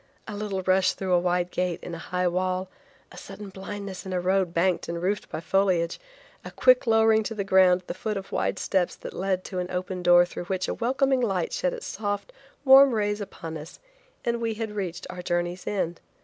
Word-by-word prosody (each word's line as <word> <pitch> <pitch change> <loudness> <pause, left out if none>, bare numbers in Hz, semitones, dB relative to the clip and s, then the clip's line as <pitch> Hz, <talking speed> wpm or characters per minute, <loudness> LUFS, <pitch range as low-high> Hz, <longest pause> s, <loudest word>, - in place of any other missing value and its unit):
A 210 - -5
little 205 -2 -3
rush 185 0 +3
through 190 -1 -2
a 175 - +5
wide 180 0 0
gate 180 -2 -1
in 175 - -6
a 165 - -5
high 180 +2 -1
wall, 185 +1 -1 0.4
a - - -13
sudden 210 -1 -9
blindness 195 -1 -7
in 190 - -5
a 180 - +1
road 185 0 +1
banked 175 +1 +1
and 170 0 -3
roofed 190 +4 -2
by - - -4
foliage, 180 -1 +1 0.4
a - - -7
quick 255 -1 +4
lowering 225 -1 +5
to 225 +1 -4
the 200 - -2
ground 185 -1 +5
at 180 - -34
the - - -3
foot 210 +2 -3
of 195 - -7
wide - - -1
steps 185 -3 0
that - - -9
led 190 -1 -1
to 185 - -5
an 180 0 -3
open 180 0 -3
door 175 0 +6
through 175 - -7
which 185 0 -2
a - - -1
welcoming 265 +2 +1
light 195 -7 -1
shed - - 0
its - - -7
soft, 205 - -4 0.3
warm 265 -1 +8
rays 205 -1 0
upon 165 -5 -7
us 150 +3 -11 0.5
and 235 0 0
we 225 -1 -1
had 220 -1 -4
reached 185 -4 -4
our 180 - -7
journey's 175 +1 -2
end. 175 -4 -2
190 Hz, 220 wpm, -26 LUFS, 180-210 Hz, 0.5 s, warm